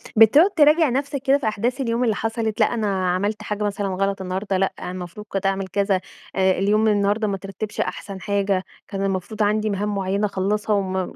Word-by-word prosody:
بتقعُد 280 Hz, -, +7 dB
تراجِع 305 Hz, 0 st, +5 dB
نَفسَك 275 Hz, +2 st, -2 dB
كده 275 Hz, +1 st, +4 dB
في 250 Hz, -6 st, -3 dB
أحداث 235 Hz, +5 st, -1 dB
اليوم 235 Hz, 0 st, 0 dB
اللي 225 Hz, -3 st, +1 dB
حصلت؟ 225 Hz, -1 st, -2 dB
لأ، -, -, +3 dB
أنا 195 Hz, -5 st, 0 dB
عَملت 205 Hz, +3 st, -1 dB
حاجة 210 Hz, 0 st, -3 dB
مثلًا 205 Hz, -1 st, -1 dB
غلط 195 Hz, +1 st, -1 dB
النهارده، 190 Hz, +1 st, -2 dB
لأ، 195 Hz, 0 st, +1 dB, 0.2 s
المفروض 180 Hz, +3 st, -7 dB
كنت 195 Hz, 0 st, -3 dB
أعمل 195 Hz, 0 st, 0 dB
كذا، 195 Hz, 0 st, +1 dB, 0.3 s
آآ 190 Hz, 0 st, +3 dB
اليوم 210 Hz, +4 st, +2 dB
النهارده 205 Hz, +1 st, +2 dB
ما 200 Hz, -, -1 dB
اترَتِّبش 195 Hz, +2 st, -7 dB
أحسن 195 Hz, -2 st, -5 dB
حاجة، 200 Hz, -2 st, 0 dB, 0.2 s
كان 195 Hz, -1 st, -4 dB
المفروض 195 Hz, +3 st, -2 dB
عندي 215 Hz, +1 st, +1 dB
مهام 205 Hz, +1 st, -1 dB
مُعيّنة 195 Hz, +2 st, 0 dB
أخلَّصها، 205 Hz, +2 st, 0 dB
وم 190 Hz, -2 st, -2 dB
205 Hz, 190 wpm, -22 LUFS, 195-220 Hz, 0.3 s, بتقعُد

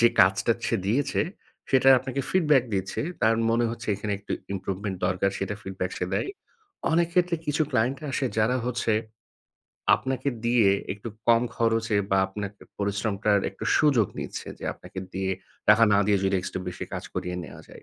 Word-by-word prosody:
যে 120 Hz, -, +7 dB
কাজটা 95 Hz, +1 st, +4 dB
সে -, -, +1 dB
দিয়েছে 130 Hz, +8 st, +1 dB, 0.5 s
সেটার 130 Hz, 0 st, +6 dB
আপনাকে 135 Hz, +1 st, -3 dB
feedback 150 Hz, -8 st, +4 dB
দিয়েছে। 95 Hz, -1 st, -2 dB, 0.2 s
তার 115 Hz, +1 st, +5 dB, 0.2 s
মনে 115 Hz, +1 st, +2 dB
হচ্ছে 115 Hz, -1 st, -7 dB
এখানে 105 Hz, 0 st, -3 dB
একটু 100 Hz, -, -6 dB, 0.2 s
improvement 95 Hz, +1 st, -3 dB
দরকার 95 Hz, +1 st, +1 dB
সেটা 100 Hz, +1 st, -2 dB
feedback 95 Hz, -1 st, -4 dB
সে 90 Hz, -, -1 dB
দেয়। -, -, -1 dB, 0.6 s
অনেক 170 Hz, +1 st, +4 dB
ক্ষেত্রে 175 Hz, -1 st, +3 dB
কিছু 150 Hz, +2 st, +1 dB
client 125 Hz, +5 st, +1 dB
আসে 130 Hz, 0 st, 0 dB
যারা 115 Hz, +4 st, +3 dB
হচ্ছে 120 Hz, -2 st, 0 dB, 1.0 s
আপনাকে 135 Hz, +1 st, -2 dB, 0.2 s
দিয়ে 115 Hz, -4 st, +4 dB, 0.2 s
একটু 105 Hz, +3 st, -8 dB, 0.2 s
কম 115 Hz, 0 st, +6 dB
খরচে 115 Hz, -2 st, +1 dB
বা 95 Hz, -, +4 dB
আপনার 100 Hz, +1 st, -5 dB, 0.3 s
পরিশ্রমটার 100 Hz, 0 st, +1 dB
একটু 95 Hz, -, -8 dB
সুযোগ 135 Hz, -9 st, +4 dB
নিচ্ছে -, -, -5 dB
যে -, -, -8 dB
আপনাকে 95 Hz, -, -11 dB
দিয়ে, 95 Hz, 0 st, -1 dB, 0.4 s
টাকা 105 Hz, +2 st, +7 dB
না 100 Hz, -, +5 dB
দিয়ে 100 Hz, -2 st, +3 dB
যদি 95 Hz, 0 st, +2 dB
একটু 95 Hz, -, -4 dB
বেশি 90 Hz, -, -5 dB
কাজ -, -, -4 dB
করিয়ে 90 Hz, 0 st, -3 dB
নেওয়া -, -, -11 dB
যায়। -, -, -13 dB
110 Hz, 170 wpm, -26 LUFS, 95-130 Hz, 1.0 s, যে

